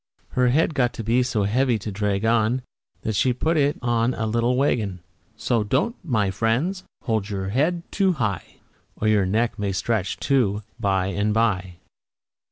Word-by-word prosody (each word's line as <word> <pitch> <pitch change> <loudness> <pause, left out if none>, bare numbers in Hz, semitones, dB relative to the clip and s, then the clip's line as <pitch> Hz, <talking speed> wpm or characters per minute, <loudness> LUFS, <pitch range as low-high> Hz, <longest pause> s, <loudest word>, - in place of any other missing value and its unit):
Her 125 0 +2
head 155 +6 +2
got 125 -4 +1
to 115 - -6
be 115 +3 +2
so 120 -4 0
heavy 120 +4 +2
to 105 +1 -6
drag 100 +1 -1
on, 115 +2 +2 0.4
That 110 - -1
she 115 +6 +2
had 125 0 -2
to - - -6
put 165 +1 +3
it 145 -1 +2
on 120 +1 +1
a 110 - -2
little 115 +3 +1
wagon. 105 -9 0 0.4
So 115 -1 +1
don't, 135 - 0
my 110 - +1
friends, 125 - 0 0.2
hold 110 -4 -1
your 95 -2 -3
head 160 - +1
too 195 -3 +2
high, 110 - -3 0.4
Or 110 - -1
your 105 -3 +3
neck 110 +2 0
may 100 -1 -1
stretch, 100 +1 -1
too, 110 -7 +1 0.2
by 95 -4 +1
and 105 +2 0
by. 95 -6 +1
115 Hz, 180 wpm, -23 LUFS, 105-125 Hz, 0.4 s, put